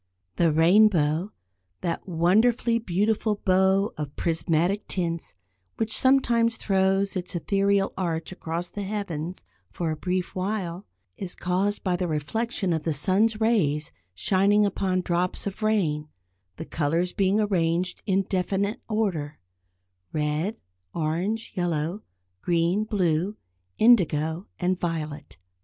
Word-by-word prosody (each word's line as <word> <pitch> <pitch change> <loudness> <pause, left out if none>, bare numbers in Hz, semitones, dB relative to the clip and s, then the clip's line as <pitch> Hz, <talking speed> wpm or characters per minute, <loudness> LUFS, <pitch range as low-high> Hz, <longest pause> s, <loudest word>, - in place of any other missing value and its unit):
The 170 -2 +4
rainbow, 170 0 +4 0.5
that 170 +2 -3
wonderfully 220 +8 +3
beautiful 210 +2 0
bow 190 +2 +3
of 145 -2 -5
prismatic 170 +4 0
tints, 170 - -3 0.4
which 225 -1 0
sometimes 235 -4 +3
throws 195 0 +1
its 180 0 -4
ethereal 195 +2 +1
arch 170 -3 -2
across 170 -1 -5
the 205 - -5
heavens 185 -4 -4 0.2
for 165 -2 -3
a - - -2
brief 180 +3 -2
while, 185 -2 -3 0.3
is 185 -2 -5
caused 190 +3 -1
by 185 -2 +1
the 180 0 -1
reflection 185 +5 -1
of 160 - -1
the 160 -1 -1
sun's 205 +8 +2
rays 165 -9 +1 0.2
shining 200 - +3
upon 190 -2 0
drops 180 +1 -1
of 200 +2 -5
rain, 170 -9 +1 0.5
the 160 - -7
colours 165 +4 -1
being 195 0 +2
arranged 180 -3 0
in 195 0 +2
definite 195 +2 -1
order; 180 -10 -1 0.7
red, 155 +7 -1 0.4
orange, 175 +8 -2
yellow, 175 +1 -1 0.4
green, 175 +4 +1
blue, 185 -1 0 0.4
indigo 175 -6 +3
and 180 0 0
violet. 155 -3 -4
185 Hz, 120 wpm, -26 LUFS, 165-205 Hz, 0.7 s, The